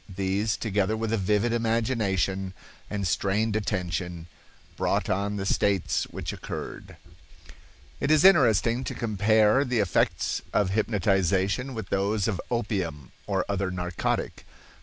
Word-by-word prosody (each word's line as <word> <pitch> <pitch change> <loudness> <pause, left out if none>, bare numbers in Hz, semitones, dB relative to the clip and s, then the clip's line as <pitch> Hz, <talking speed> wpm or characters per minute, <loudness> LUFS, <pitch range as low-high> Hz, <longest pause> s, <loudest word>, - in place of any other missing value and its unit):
These, 100 +3 -1
together 105 0 0
with 115 0 -2
a - - +2
vivid 105 +4 +1
imagination 110 -5 0 0.3
and 100 -2 -2
strained 100 +7 0
attention, 90 -5 -2 0.5
brought - - 0
on 100 +2 -1
the 95 -1 -3
states 100 -1 +1
which - - -6
occurred." - - -7 1.0
It 140 - -1
is 155 +2 +5
interesting 120 - +5
to - - -4
compare 110 +3 +3
the 125 -3 -1
effects 100 -5 +1
of 100 -3 +2
hypnotization 100 +3 +1
with 110 -4 -6
those 100 +1 0
of 100 -5 -1
opium 95 - -2 0.2
or 95 -3 0
other 100 -1 -1
narcotic. 90 -1 -2
Dr. - - -16
100 Hz, 130 wpm, -26 LUFS, 95-115 Hz, 1.0 s, is